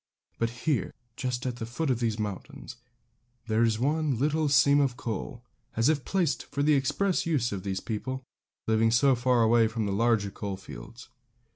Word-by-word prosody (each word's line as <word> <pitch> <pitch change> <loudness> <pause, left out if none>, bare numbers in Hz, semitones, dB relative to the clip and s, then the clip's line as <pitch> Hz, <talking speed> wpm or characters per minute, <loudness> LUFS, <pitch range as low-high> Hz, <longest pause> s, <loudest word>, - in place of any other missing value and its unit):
But 115 - +1 0.2
here, 145 - 0 0.2
just 125 -1 -3
at 125 -2 -2
the 115 - -4
foot 135 +5 -1
of 120 - 0
these 115 -3 0
mountains, 120 +5 -6 0.7
there 110 0 +1
is 115 -2 +3
one 145 +1 0
little 150 +3 +1
seam 140 +1 +5
of 135 -4 +1
coal, 120 +2 -5 0.3
as 115 +5 +3
if 150 -4 0
placed 180 -6 0
for 140 - -2
the 150 +1 +4
express 165 +8 +1
use 140 -8 +1
of 100 -2 -4
these 95 0 -3
people, 130 +4 -4 0.4
living 110 0 +3
so 130 +4 +4
far 125 -1 +2
away 115 0 +4
from 110 -1 -2
the 100 - -1
larger 110 -2 +2
coal 100 -1 -5
fields. 95 - -11
120 Hz, 180 wpm, -28 LUFS, 110-140 Hz, 0.7 s, seam